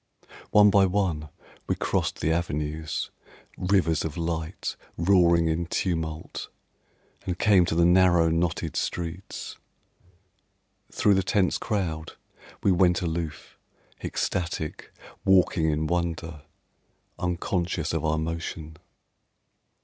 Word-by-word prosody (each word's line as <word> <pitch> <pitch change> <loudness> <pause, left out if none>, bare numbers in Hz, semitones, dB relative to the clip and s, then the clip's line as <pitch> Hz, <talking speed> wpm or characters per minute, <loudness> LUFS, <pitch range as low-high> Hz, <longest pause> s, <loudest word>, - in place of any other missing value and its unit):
One 105 -1 +6
by 95 -1 +5
one 90 -6 -1 0.4
we - - +1
crossed - - -1
the 80 - +1
avenues, 80 -2 -2 0.4
Rivers 90 -4 +1
of 80 -1 -4
light, 80 0 -3 0.2
roaring 85 -2 +4
in 80 +1 -1
tumult, 80 -3 -3 0.8
And 90 -1 -1
came 100 -4 +5
to 80 - -1
the 85 0 +4
narrow, 90 -2 +5
knotted 80 0 -1
streets. 85 +2 -4 1.3
Thru 105 - +3
the 95 - +3
tense 95 0 +1
crowd 80 -7 -2 0.5
We 100 - +4
went 90 -1 +3
aloof, 85 -1 -4 0.4
ecstatic, 85 -3 -3 0.3
walking 90 -4 +3
in 75 +1 0
wonder, 85 -2 -2 0.8
Unconscious 90 -2 -1
of 80 -2 -1
our 80 0 +1
motion. 80 -1 -4
85 Hz, 105 wpm, -26 LUFS, 80-90 Hz, 1.3 s, One